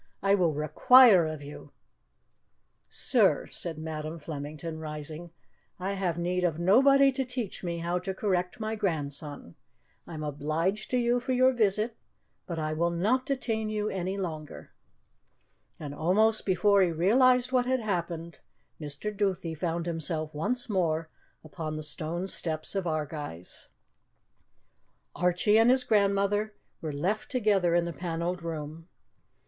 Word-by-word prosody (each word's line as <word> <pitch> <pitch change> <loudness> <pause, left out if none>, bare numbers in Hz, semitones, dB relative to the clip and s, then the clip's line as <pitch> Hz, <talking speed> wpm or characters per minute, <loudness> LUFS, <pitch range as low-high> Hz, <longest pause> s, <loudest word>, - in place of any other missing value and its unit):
I 195 0 +4
will 175 -6 +2
require 190 - +6
of 155 -2 -6
you 145 +1 -10 0.7
" - - -47 0.2
"Sir," - - +4
said 165 -3 -2
Madam 155 0 -5
Flemington, 155 +1 -6
rising, 155 +2 -5 0.5
"I 190 +2 -2
have 185 -4 -2
need 180 +1 -1
of 165 -3 +1
nobody 275 +10 +5
to 265 0 -2
teach 250 -7 -5
me 170 -1 -3
how 170 +1 -1
to 190 +2 -4
correct 180 -2 -1
my 220 0 -3
grandson. 150 - -4 0.5
I 165 - -8
am 155 - -5
obliged 155 +8 -2
to 250 - +1
you 240 0 +2
for 255 +1 -2
your 255 +1 +5
visit, 215 0 +1 0.5
but 170 - -4
I 155 -1 -2
will 170 +2 +1
not 215 +10 0
detain 225 -6 -1
you 215 0 -2 0.3
longer." 155 -6 -6 1.1
And 145 -2 -6
almost 210 +9 +2
before 200 +2 +4
he 185 - +3
realized 250 +9 +3
what 250 -1 +2
had 260 0 +1
happened, 170 -5 -3 0.4
Mr. 150 +8 -4
Duthie 190 -5 -1
found 165 +1 -2
himself 160 -2 -2
once 235 +12 -2
more 165 -6 0 0.3
upon 155 0 -6
the 155 - -4
stone 160 +4 -3
steps 160 -4 -1
of 195 -3 -2
Ardguys. 150 - -4 1.5
Archie 180 +5 +3
and 225 +2 +5
his 255 0 +4
grandmother 205 -1 +1 0.3
were 155 - -3
left 185 +10 -2
together 205 -9 +2
in 175 0 +2
the 170 - -4
panelled 175 +1 -3
room. 160 0 -6
175 Hz, 145 wpm, -28 LUFS, 155-215 Hz, 1.5 s, require